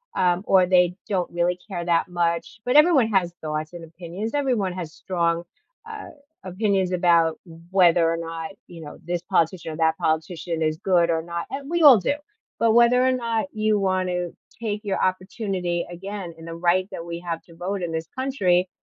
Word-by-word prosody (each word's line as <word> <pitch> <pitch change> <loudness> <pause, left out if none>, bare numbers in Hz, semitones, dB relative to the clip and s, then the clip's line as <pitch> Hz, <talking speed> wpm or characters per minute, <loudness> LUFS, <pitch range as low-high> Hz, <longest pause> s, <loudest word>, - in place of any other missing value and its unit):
um, 180 +1 +2
or 185 -2 +5
they 180 -1 +3
don't 185 -4 -1
really 175 +1 0
care 175 -4 -4
that 170 0 +1
much, 170 +3 -1
but 250 - +1
everyone 300 -6 +6
has 185 -5 +1
thoughts 155 0 -3
and 170 -1 -8
opinions, 175 +6 -6
everyone 245 -10 0
has 170 -4 -6
strong, 170 -2 -1 0.4
uh, 440 -1 -8 0.4
opinions 190 -1 0
about 170 -2 +3 0.3
whether 175 -3 +5
or 165 - -1
not, 165 +3 -5 0.2
you 170 -2 -11
know, 150 - -9
this 175 0 -2
politician 165 0 0
or 155 - -7
that 160 0 +2
politician 160 +1 -2
is 155 0 0
good 175 -3 +2
or 165 -1 +1
not, 170 0 -5
and 275 +1 -6
we 345 0 0
all 280 -6 +9
do, 285 - 0 0.4
but 230 -1 +3
whether 240 +1 +5
or 260 - +4
not 230 -2 -1
you 215 -1 +1
wanna 185 -2 0 0.3
take 210 -2 -3
your 200 -2 -2
opportunity 185 -2 -2
again 185 0 -7
in 165 - -12
the 165 - -6
right 180 +3 +1
that 170 -2 -6
we 170 0 -5
have 170 -1 -4
to 170 - -17
vote 185 +3 -3
in 170 -2 -3
this 160 0 -3
country 190 -10 +1
180 Hz, 190 wpm, -24 LUFS, 170-205 Hz, 0.4 s, all